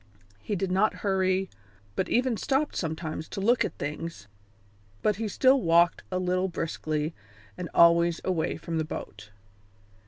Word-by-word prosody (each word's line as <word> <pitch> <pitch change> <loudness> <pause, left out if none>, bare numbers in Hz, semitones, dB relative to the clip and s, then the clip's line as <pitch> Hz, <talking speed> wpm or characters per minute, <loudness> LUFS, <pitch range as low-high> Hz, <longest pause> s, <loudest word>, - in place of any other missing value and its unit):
He 205 - -3
did 190 0 -2
not 195 +4 +2
hurry, 190 -1 +1 0.5
but - - -1
even 250 0 +2
stopped 275 +6 0
sometimes 160 -1 -3
to - - -5
look 230 +5 +3
at - - -4
things, 150 -6 -5 0.8
but 210 -2 +2
he 225 0 -2
still 260 +6 +4
walked 170 -1 +4
a 185 - 0
little 185 +1 0
briskly, 155 -2 -3 0.4
and 175 - -6
always 170 0 +5
away 180 -4 -1
from 165 0 -3
the - - +1
boat. 105 -8 -8
180 Hz, 150 wpm, -27 LUFS, 160-195 Hz, 0.8 s, always